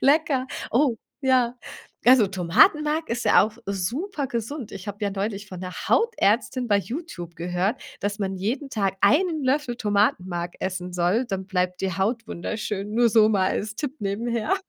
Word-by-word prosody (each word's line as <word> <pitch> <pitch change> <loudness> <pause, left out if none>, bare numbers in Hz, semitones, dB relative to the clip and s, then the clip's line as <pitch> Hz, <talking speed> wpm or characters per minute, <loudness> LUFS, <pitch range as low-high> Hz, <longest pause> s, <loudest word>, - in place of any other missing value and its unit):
Lecker. 275 -2 +3 0.2
Oh, 250 -1 +3 0.2
ja. 255 -3 +2 0.5
Also, 250 -3 +7
Tomatenmark 300 - +3
ist 240 +1 -2
ja - - +6
auch 215 +1 -2
super 265 - -2
gesund. 235 +1 -4
Ich 185 - -8
habe 205 0 -6
ja 205 -1 0
neulich 200 +1 -3
von 185 - -8
'ner 185 0 -6 0.2
Hautärztin 255 - +2
bei 205 - +4
YouTube 200 - -6
gehört, 180 +7 -1 0.2
dass 205 +1 -2
man 190 -1 -2
jeden 245 +9 -3
Tag 195 -5 0
1 310 - +3
Löffel 260 -2 0
Tomatenmark 190 -5 0
essen 180 -1 -3
soll, 180 +7 +1
dann 190 -3 -4
bleibt 180 -2 -1
die 190 -2 -2
Haut 225 +4 -1
wunderschön, 210 +2 -4
nur 235 +1 +4
so 215 -1 +5
mal 195 -3 +2
als 210 0 -3
Tipp 290 +3 -4
nebenher, 220 - -1
215 Hz, 165 wpm, -24 LUFS, 190-255 Hz, 0.5 s, Also